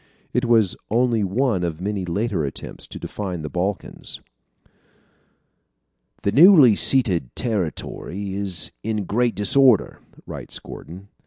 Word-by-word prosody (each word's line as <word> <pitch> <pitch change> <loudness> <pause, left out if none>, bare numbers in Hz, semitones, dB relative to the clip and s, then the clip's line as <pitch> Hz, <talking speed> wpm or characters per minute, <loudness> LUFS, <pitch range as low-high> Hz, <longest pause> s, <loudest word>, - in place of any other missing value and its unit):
It 125 0 +1
was 115 -6 +3
only 115 -1 +2
one 100 -1 0
of 85 -2 -3
many 100 0 -3
later 95 -1 -1
attempts 70 - -7
to - - -9
define 90 -6 -5
the 75 - -6
Balkans. 95 +4 -4 2.0
"The 100 - +1
newly 145 - +7
ceded 95 - +1
territory 100 - -3
is 95 -6 -2
in 110 -2 -2
great 120 +3 0
disorder," 120 +4 +3 0.3
writes - - -6
Gordon. 95 +4 -11
100 Hz, 115 wpm, -22 LUFS, 90-120 Hz, 2.0 s, newly